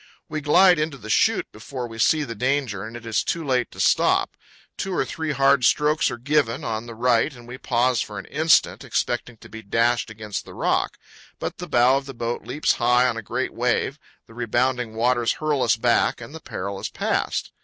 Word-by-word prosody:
We 155 Hz, -1 st, -4 dB
glide 175 Hz, +4 st, +5 dB
into 155 Hz, -2 st, -2 dB
the 110 Hz, -3 st, -6 dB
chute -, -, +3 dB
before 120 Hz, +3 st, -7 dB
we 115 Hz, -1 st, -10 dB
see 155 Hz, +6 st, +3 dB
the 120 Hz, -5 st, -5 dB
danger, 125 Hz, -3 st, -1 dB
and 115 Hz, +2 st, -7 dB
it 120 Hz, -, -12 dB
is 110 Hz, -1 st, 0 dB
too 165 Hz, -2 st, -2 dB
late 125 Hz, -3 st, +1 dB
to -, -, -14 dB
stop. -, -, +2 dB, 0.4 s
Two 195 Hz, -1 st, -3 dB
or -, -, +1 dB
three 160 Hz, -2 st, -3 dB
hard 140 Hz, -1 st, +3 dB
strokes 150 Hz, +4 st, +3 dB
are 120 Hz, -, -5 dB
given 130 Hz, -2 st, 0 dB
on 115 Hz, 0 st, -3 dB
the 115 Hz, -, -8 dB
right 120 Hz, +4 st, +2 dB
and 120 Hz, -3 st, -14 dB
we 125 Hz, +1 st, -9 dB
pause 125 Hz, 0 st, +1 dB
for 105 Hz, -, -6 dB
an 100 Hz, -, -6 dB
instant, 160 Hz, +1 st, +2 dB
expecting 120 Hz, -1 st, -2 dB
to -, -, -14 dB
be 110 Hz, -, -9 dB
dashed 115 Hz, +3 st, +1 dB
against 110 Hz, -2 st, -6 dB
the -, -, -13 dB
rock. -, -, 0 dB, 0.4 s
But -, -, -5 dB
the 180 Hz, -, -6 dB
bow 125 Hz, +1 st, +4 dB
of 135 Hz, 0 st, -5 dB
the 135 Hz, -, -8 dB
boat 115 Hz, 0 st, -4 dB
leaps 150 Hz, -, 0 dB
high 125 Hz, +1 st, +4 dB
on 125 Hz, -, -1 dB
a 115 Hz, -, -4 dB
great 120 Hz, +5 st, -3 dB
wave, 125 Hz, +4 st, 0 dB, 0.3 s
the -, -, -17 dB
rebounding 120 Hz, 0 st, -1 dB
waters 120 Hz, +1 st, +2 dB
hurl 150 Hz, -3 st, -1 dB
us 115 Hz, -, +3 dB
back, 120 Hz, +1 st, +2 dB
and 120 Hz, +4 st, -10 dB
the 160 Hz, -, -9 dB
peril 100 Hz, -5 st, -5 dB
is -, -, -4 dB
past. -, -, -2 dB
125 Hz, 215 wpm, -23 LUFS, 115-140 Hz, 0.4 s, glide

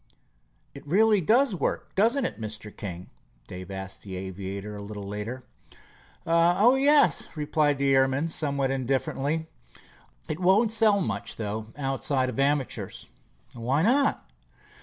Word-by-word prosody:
"It 140 Hz, -, -11 dB
really 210 Hz, +4 st, +4 dB
does 235 Hz, -, +3 dB
work, 180 Hz, -, -3 dB
doesn't 235 Hz, +7 st, +2 dB
it, -, -, -5 dB
Mr. 110 Hz, -1 st, -6 dB
King?" 90 Hz, -3 st, -7 dB, 0.3 s
Dave 90 Hz, 0 st, -9 dB
asked 95 Hz, -1 st, -6 dB
of -, -, -17 dB
the 95 Hz, -2 st, -6 dB
aviator 95 Hz, +2 st, -6 dB
a 100 Hz, -, -7 dB
little 100 Hz, -1 st, -7 dB
later. 105 Hz, +5 st, -5 dB, 0.8 s
"Oh, 175 Hz, +8 st, +4 dB
yes," 270 Hz, -, +4 dB
replied 150 Hz, -1 st, +1 dB
the 140 Hz, 0 st, +2 dB
airman, 135 Hz, +4 st, +2 dB
somewhat 140 Hz, -4 st, +1 dB
indifferently. 135 Hz, +4 st, -1 dB, 0.8 s
"It 155 Hz, +1 st, -4 dB
won't 195 Hz, +5 st, +3 dB
sell 215 Hz, -3 st, +4 dB
much, 100 Hz, -, -3 dB
though, 110 Hz, 0 st, -4 dB
outside 135 Hz, -1 st, 0 dB
of 125 Hz, -, -5 dB
amateurs." 140 Hz, -1 st, -1 dB, 0.4 s
"Why 125 Hz, +6 st, 0 dB
not?" 275 Hz, +6 st, +2 dB
140 Hz, 135 wpm, -26 LUFS, 110-180 Hz, 0.8 s, really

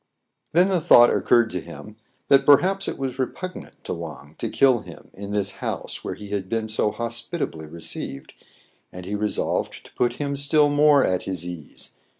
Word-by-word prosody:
Then 180 Hz, +4 st, +5 dB
the 185 Hz, -3 st, +1 dB
thought 120 Hz, -5 st, +7 dB
occurred 120 Hz, -2 st, +3 dB
to 90 Hz, -, -3 dB
him, 105 Hz, +5 st, -11 dB, 0.3 s
that 135 Hz, 0 st, +5 dB
perhaps 185 Hz, +8 st, +4 dB
it -, -, -3 dB
was 130 Hz, -1 st, -4 dB
repugnant 180 Hz, +7 st, -5 dB
to -, -, -4 dB
Wang 75 Hz, -3 st, -8 dB
to -, -, -2 dB
kill 130 Hz, -3 st, +4 dB
him -, -, -13 dB
in 100 Hz, +1 st, -8 dB
this 105 Hz, -1 st, -1 dB
house -, -, -4 dB
where -, -, -4 dB
he 105 Hz, -1 st, -10 dB
had 100 Hz, -2 st, -3 dB
been 115 Hz, -1 st, -1 dB
so 110 Hz, -1 st, +1 dB
hospitably 115 Hz, -, -4 dB
received, 75 Hz, -4 st, -6 dB, 0.6 s
and 90 Hz, 0 st, -9 dB
he 100 Hz, -, -5 dB
resolved 105 Hz, 0 st, -2 dB
to -, -, -17 dB
put 120 Hz, -1 st, +1 dB
him 140 Hz, +2 st, -3 dB
still 145 Hz, +1 st, +3 dB
more 145 Hz, -1 st, +5 dB
at 90 Hz, -1 st, -1 dB
his 90 Hz, -3 st, -4 dB
ease. 85 Hz, -4 st, -7 dB
115 Hz, 180 wpm, -23 LUFS, 95-140 Hz, 0.6 s, thought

